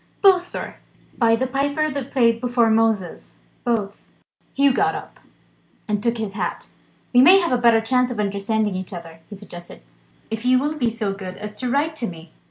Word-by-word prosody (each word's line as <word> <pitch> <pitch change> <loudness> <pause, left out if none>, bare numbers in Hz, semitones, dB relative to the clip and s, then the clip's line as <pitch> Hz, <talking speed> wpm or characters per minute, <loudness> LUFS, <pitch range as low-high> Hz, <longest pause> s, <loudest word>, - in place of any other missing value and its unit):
"Both, 365 -2 +5
sir! - - -6 0.4
By 230 -2 +4
the 255 +3 -1
piper 285 +4 -1
that 275 -1 -5
played 230 -3 +2
before 240 -2 +2
Moses, 220 -5 -1 0.2
both!" 215 -5 -2 0.5
Hugh 275 -1 +4
got 400 +6 +1
up, 405 - -9 0.7
and 210 -1 -1
took 235 +1 0
his 215 -3 -4
hat: 210 - -4 0.4
"We 245 - +7
may 365 +8 +8
have 340 -6 -1
a 250 -1 +1
better 230 -2 +5
chance 250 +2 +1
of 240 -3 -5
understanding 210 +1 -1
each 185 +1 -6
other," 165 -2 -9
he 205 - -8
suggested, 175 - -12 0.5
"if 225 0 -4
you 255 +1 +4
will 290 +4 0
be 255 -6 0
so 215 -3 -3
good 185 -2 -8
as 210 0 -8
to 255 - -2
write 295 +5 0
to 235 - -2
me." 165 -2 -10
230 Hz, 190 wpm, -22 LUFS, 205-265 Hz, 0.7 s, may